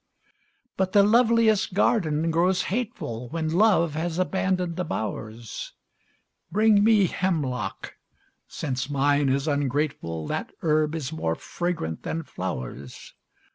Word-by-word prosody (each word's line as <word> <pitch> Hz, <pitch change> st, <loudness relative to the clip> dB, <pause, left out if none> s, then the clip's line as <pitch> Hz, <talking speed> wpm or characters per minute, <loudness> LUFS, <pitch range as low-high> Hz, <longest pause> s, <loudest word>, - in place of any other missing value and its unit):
But 190 Hz, -1 st, 0 dB
the 200 Hz, -, +7 dB
loveliest 225 Hz, -3 st, +3 dB
garden 165 Hz, -7 st, +2 dB
grows 180 Hz, +3 st, +2 dB
hateful 155 Hz, -, -4 dB
When 160 Hz, 0 st, -2 dB
love 180 Hz, -5 st, +4 dB
has 165 Hz, +2 st, -2 dB
abandoned 185 Hz, -2 st, 0 dB
the 180 Hz, -, -2 dB
bowers; 110 Hz, -, -5 dB, 0.8 s
Bring 210 Hz, +1 st, +4 dB
me 215 Hz, -3 st, +5 dB
hemlock 155 Hz, -10 st, -2 dB, 0.5 s
since 130 Hz, -3 st, -3 dB
mine 145 Hz, 0 st, +2 dB
is 135 Hz, +3 st, 0 dB
ungrateful, 140 Hz, -, -1 dB
That -, -, -4 dB
herb 155 Hz, -1 st, +2 dB
is 155 Hz, -1 st, -4 dB
more 80 Hz, -, -1 dB
fragrant 170 Hz, -, -3 dB
than 165 Hz, 0 st, -3 dB
flowers. 70 Hz, -, -6 dB
160 Hz, 115 wpm, -25 LUFS, 135-190 Hz, 0.8 s, the